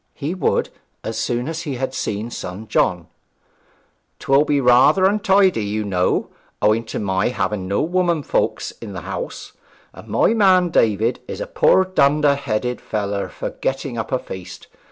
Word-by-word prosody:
He 150 +3 -3
would, 185 - 0 0.3
as - - -4
soon 120 +2 -1
as 165 +1 -4
he 145 -6 -4
had 130 +1 -3
seen 110 -1 -3
son 95 +3 -7
John. 90 -4 +1 1.1
''Twill 140 +2 +3
be 145 -1 +2
rather 130 +9 +5
untidy, 195 - +3
you 105 +1 -2
know, 90 -3 0 0.3
owing 110 +2 +2
to - - -5
my 95 -1 0
having 105 -6 -2
no 100 +2 0
womenfolks 170 -2 0
in - - -7
the - - -6
house; - - -6 0.4
and - - -13
my - - +2
man 185 -5 +4
David 115 - +2
is - - -6
a - - -3
poor 340 - +3
dunder 150 -5 +3
headed 125 -3 -2
feller 100 -2 -3
for - - -5
getting 135 -1 -3
up 115 -1 -4
a 130 - +2
feast. 95 -7 -9
130 Hz, 160 wpm, -20 LUFS, 105-170 Hz, 1.1 s, rather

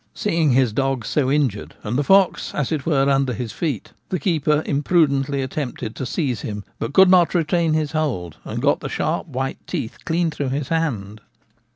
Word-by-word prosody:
Seeing 165 -8 +1
his 125 -4 +3
dogs 135 -3 -1
so 135 -4 +1
injured 135 -8 0
and 105 +3 -3
the 145 - +2
fox 195 +3 +3
as 150 -1 -1
it 155 -3 -2
were 140 -4 +3
under 135 -2 +2
his 115 0 -4
feet, 145 - -3 0.2
the 185 - 0
keeper 155 -2 +1
imprudently 140 -2 +1
attempted 130 -4 -4
to 130 - -4
seize 135 - -1
him, 105 -2 -5 0.2
but - - -3
could 190 +6 +7
not 180 -1 +5
retain 165 -1 +2
his 155 -2 0
hold, 120 - -2
and - - -5
got - - +3
the - - -5
sharp - - -1
white 135 +1 -3
teeth 110 - -5
clean 165 0 0
through 145 -3 -3
his 135 0 -3
hand. 110 -11 -2
140 Hz, 190 wpm, -21 LUFS, 125-160 Hz, 0.2 s, could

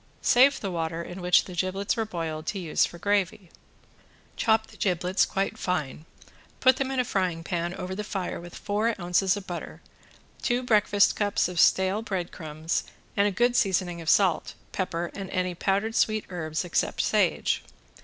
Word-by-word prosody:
Save 265 +3 +5
the 195 - -3
water 165 -1 -2
in 180 +2 -8
which 180 0 +4
the 185 - -9
giblets 185 +4 -1
were 225 -2 -1
boiled 165 -5 -4
to 205 - -2
use 170 -5 +1
for 170 - -11
gravy. 195 -1 -1 0.8
Chop 220 -1 +2
the - - -17
giblets 180 0 +1
quite 195 0 -2
fine, 155 -4 -2 0.5
put 260 0 +5
them 270 -1 -1
in 265 -1 -1
a 250 - +2
frying 180 -6 -1
pan 175 +1 -2
over 185 +1 -5
the 210 +2 -4
fire 190 -4 -4
with 175 0 -11
four 210 +2 -1
ounces 180 +2 +2
of 200 - -7
butter, 175 -3 -6 0.6
two 245 +1 0
breakfast 210 -3 +3
cups 205 -4 +1
of 180 -1 -4
stale 190 +4 +4
breadcrumbs 170 -6 -3 0.3
and 200 0 +3
a - - 0
good 240 +5 +2
seasoning 180 -5 +1
of 165 - -3
salt, 185 -5 +3 0.2
pepper 175 -2 -2
and 195 -2 -6
any 185 -1 -1
powdered 200 +5 0
sweet 215 -1 +1
herbs 160 -1 -3
except 175 - 0
sage. - - +1
185 Hz, 175 wpm, -27 LUFS, 175-205 Hz, 0.8 s, Save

